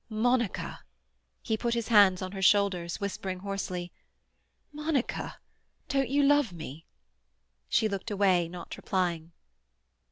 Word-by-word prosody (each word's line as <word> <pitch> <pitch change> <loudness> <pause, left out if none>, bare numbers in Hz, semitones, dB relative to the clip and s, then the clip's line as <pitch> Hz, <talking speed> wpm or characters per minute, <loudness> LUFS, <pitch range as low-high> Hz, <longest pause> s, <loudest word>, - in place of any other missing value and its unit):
"Monica!" 235 0 0 0.6
He 220 - 0
put 235 +1 -1
his 235 -1 -2
hands 200 -4 +6
on 185 - -5
her 195 -1 -6
shoulders, 185 -3 +3
whispering 190 -2 -4
hoarsely, 185 -3 -4 0.8
"Monica! 300 -3 -2 0.5
don't 270 -3 +1
you 285 +2 +3
love 290 -5 +4
me?" 160 -2 -9 0.8
She 220 - +3
looked 200 +1 -4
away, 190 -4 +3
not 175 0 -8
replying. 170 -3 -1
200 Hz, 120 wpm, -29 LUFS, 180-235 Hz, 0.8 s, hands